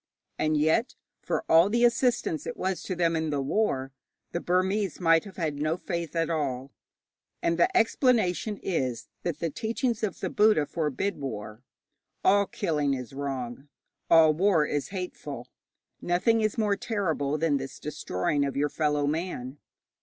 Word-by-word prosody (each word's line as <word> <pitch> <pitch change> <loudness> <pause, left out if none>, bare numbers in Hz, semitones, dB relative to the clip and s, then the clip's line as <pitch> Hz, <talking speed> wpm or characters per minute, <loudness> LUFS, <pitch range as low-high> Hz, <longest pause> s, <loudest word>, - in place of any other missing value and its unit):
And 155 0 +2
yet, 160 - +2 0.3
for - - -2
all 165 +4 +6
the 235 +3 +3
assistance 235 -9 +1
it - - -5
was 190 0 -2
to 185 - -4
them 170 -1 +1
in 160 -1 -1
the 145 -1 -1
war, 135 -3 0 0.4
the 170 - -2
Burmese 185 +2 0
might 165 -1 +4
have 200 - -11
had 155 -5 -2
no 155 +3 0
faith 170 -3 -4
at 165 -1 +1
all. 140 -5 -2 0.7
And 170 0 +1
the 170 - +3
explanation 225 -4 +2
is, 130 -10 -2
that 170 -4 -2
the 165 0 -2
teachings 230 - -2
of 215 -3 -2
the - - -3
Buddha 210 -8 +4
forbid 160 +5 -2
war. 110 -4 -6 0.6
All 200 +1 +4
killing 150 -7 0
is 125 -1 -7
wrong, 135 -1 -5 0.4
all 160 -2 +7
war 170 -2 +3
is 145 -1 -2
hateful; 180 -9 -6 0.5
nothing 220 +6 +2
is 215 +1 0
more 210 -2 +2
terrible 165 - -1
than 155 -2 +2
this 135 0 -6
destroying 145 -2 -1
of 140 -1 -2
your 145 +1 +1
fellow 150 -1 0
man. 145 -4 -3
165 Hz, 160 wpm, -27 LUFS, 145-195 Hz, 0.7 s, all